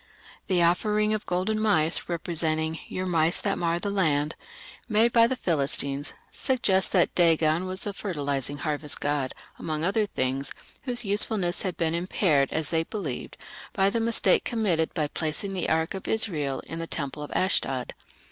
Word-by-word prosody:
The 180 Hz, -2 st, +3 dB
offering 210 Hz, +5 st, +2 dB
of 215 Hz, -, -3 dB
golden 185 Hz, +5 st, 0 dB
mice 180 Hz, -8 st, +2 dB
representing 160 Hz, -2 st, -1 dB
"your 185 Hz, -, -3 dB
mice 165 Hz, -2 st, +2 dB
that 200 Hz, -1 st, -1 dB
mar 170 Hz, -1 st, +1 dB
the 200 Hz, +3 st, -3 dB
land", 155 Hz, -6 st, +1 dB, 0.6 s
made 225 Hz, +2 st, +4 dB
by 230 Hz, -1 st, +6 dB
the 260 Hz, -, -1 dB
Philistines, 140 Hz, -, 0 dB, 0.2 s
suggests 200 Hz, -8 st, +1 dB
that 180 Hz, -3 st, +3 dB
Dagon 165 Hz, 0 st, +3 dB
was 185 Hz, +1 st, -3 dB
the 205 Hz, -, -2 dB
fertilizing 145 Hz, -, -2 dB
harvest 150 Hz, -1 st, -3 dB
god, 145 Hz, -3 st, -1 dB, 0.2 s
among 155 Hz, -1 st, -3 dB
other 205 Hz, +4 st, +1 dB
things, 135 Hz, -3 st, -2 dB, 0.3 s
whose 245 Hz, -2 st, +3 dB
usefulness 200 Hz, -3 st, +2 dB
had 185 Hz, -4 st, -3 dB
been 165 Hz, -1 st, 0 dB
impaired, 170 Hz, -4 st, +1 dB
as 160 Hz, -1 st, -1 dB
they 165 Hz, -1 st, +2 dB
believed, 165 Hz, -, -5 dB, 0.3 s
by 195 Hz, +1 st, +2 dB
the 230 Hz, -, 0 dB
mistake 230 Hz, 0 st, +3 dB
committed 190 Hz, -9 st, 0 dB
of 150 Hz, -2 st, -1 dB
placing 160 Hz, +5 st, -2 dB
the 185 Hz, -3 st, -2 dB
ark 160 Hz, +1 st, +1 dB
of 190 Hz, -, -6 dB
Israel 160 Hz, -12 st, -1 dB
in 165 Hz, -, -5 dB
the 165 Hz, -, -4 dB
temple 150 Hz, -1 st, -4 dB
at 150 Hz, -, -4 dB
Ashdod. 135 Hz, -9 st, +1 dB
170 Hz, 165 wpm, -26 LUFS, 155-200 Hz, 0.6 s, by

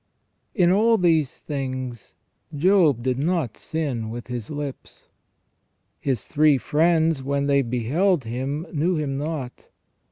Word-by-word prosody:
In 180 Hz, -5 st, +4 dB
all 225 Hz, +4 st, +4 dB
these 160 Hz, -7 st, +1 dB
things 130 Hz, -5 st, -5 dB, 0.4 s
Job 160 Hz, -, +3 dB
did 130 Hz, 0 st, 0 dB
not 160 Hz, -, 0 dB
sin 135 Hz, -9 st, -3 dB
with 120 Hz, +1 st, -6 dB
his 120 Hz, -3 st, -5 dB
lips." 145 Hz, -2 st, -7 dB, 0.9 s
His 135 Hz, -4 st, -2 dB
three 150 Hz, -2 st, +3 dB
friends, 160 Hz, +1 st, +2 dB
when 140 Hz, +1 st, -1 dB
they 140 Hz, -1 st, +3 dB
beheld 135 Hz, -, +1 dB
him, 135 Hz, +7 st, -3 dB
knew 170 Hz, +4 st, +1 dB
him 140 Hz, -3 st, -2 dB
not. 145 Hz, -4 st, -5 dB
145 Hz, 125 wpm, -23 LUFS, 130-165 Hz, 0.9 s, In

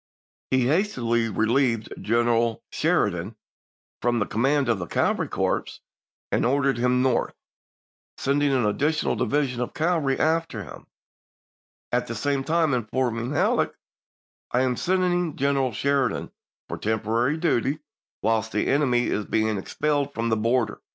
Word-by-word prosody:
He 130 Hz, -1 st, +2 dB
hastily 125 Hz, -, +1 dB
relieved 115 Hz, +1 st, +1 dB
General 115 Hz, 0 st, +1 dB
Sheridan 95 Hz, +2 st, 0 dB, 0.7 s
from 120 Hz, 0 st, +1 dB
the 105 Hz, -, +1 dB
command 135 Hz, +5 st, +1 dB
of 115 Hz, -4 st, +1 dB
the 85 Hz, -, -5 dB
cavalry -, -, 0 dB
corps, -, -, 0 dB, 0.6 s
and -, -, +1 dB
ordered 135 Hz, +1 st, +2 dB
him 125 Hz, +1 st, +2 dB
North, 130 Hz, -2 st, +1 dB, 0.8 s
send 140 Hz, +1 st, 0 dB
ing 145 Hz, -1 st, +2 dB
an 130 Hz, -4 st, +2 dB
additional 150 Hz, +9 st, +1 dB
division 135 Hz, -4 st, 0 dB
of 125 Hz, -, -4 dB
cavalry 160 Hz, -5 st, +1 dB
after 165 Hz, +1 st, 0 dB
him, -, -, -12 dB, 1.0 s
at -, -, 0 dB
the -, -, -4 dB
same 140 Hz, -2 st, -1 dB
time 160 Hz, -1 st, +1 dB
informing 120 Hz, +1 st, -1 dB
Halleck, 145 Hz, -, +1 dB, 0.4 s
" -, -, -81 dB
I 125 Hz, -, +2 dB
am 130 Hz, -1 st, +1 dB
send 185 Hz, +7 st, +1 dB
ing 175 Hz, -3 st, 0 dB
General 135 Hz, -2 st, +1 dB
Sheridan 135 Hz, +3 st, 0 dB, 0.4 s
for -, -, -6 dB
temporary 115 Hz, +6 st, 0 dB
duty 150 Hz, -4 st, +1 dB, 0.5 s
whilst 110 Hz, 0 st, +1 dB
the 105 Hz, -, +1 dB
enemy 130 Hz, -4 st, +2 dB
is 105 Hz, -, -1 dB
being 110 Hz, 0 st, 0 dB
expelled 145 Hz, +6 st, -1 dB
from 115 Hz, +1 st, -1 dB
the 110 Hz, -, +2 dB
border. 115 Hz, +3 st, 0 dB
125 Hz, 145 wpm, -25 LUFS, 115-145 Hz, 1.0 s, He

